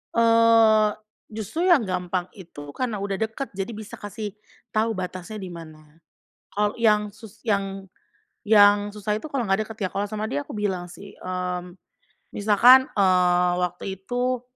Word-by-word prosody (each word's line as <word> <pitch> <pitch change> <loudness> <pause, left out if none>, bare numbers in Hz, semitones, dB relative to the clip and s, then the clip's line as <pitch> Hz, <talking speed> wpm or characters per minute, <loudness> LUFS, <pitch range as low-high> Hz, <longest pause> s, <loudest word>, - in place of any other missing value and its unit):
Eee, 230 -2 +5 0.4
justru 225 - -3
yang 325 -10 +5
gampang 180 -1 -3
itu 145 -6 -11
karena 225 - -3
udah 195 0 -3
deket, 225 +5 -3
jadi 195 +3 -4
bisa 215 -1 -9
kasih 205 0 -6 0.4
tau 220 0 0
batasnya 185 +2 -6
di 185 -2 -7
mana. 155 -2 -13 0.6
Kalau 210 0 +1
yang 210 -2 +3
sus 220 0 -15
yang 195 -2 -1 0.6
yang 205 -1 +5
susah 210 0 -3
itu 310 - -8
kalau 265 -5 -2
nggak 195 +2 +1
deket 220 -3 -5
ya, - - -2
kalau 205 +1 -1
sama 215 0 -3
dia 145 -9 -2
aku 145 - -9
bilang 185 -4 -2
sih, 200 +3 -12
mmm, 180 0 -4 0.6
misalkan, 235 +6 +6
eee, 180 -2 +3
waktu 180 - -3 0.2
itu, 250 +2 -1
205 Hz, 155 wpm, -24 LUFS, 185-220 Hz, 0.6 s, misalkan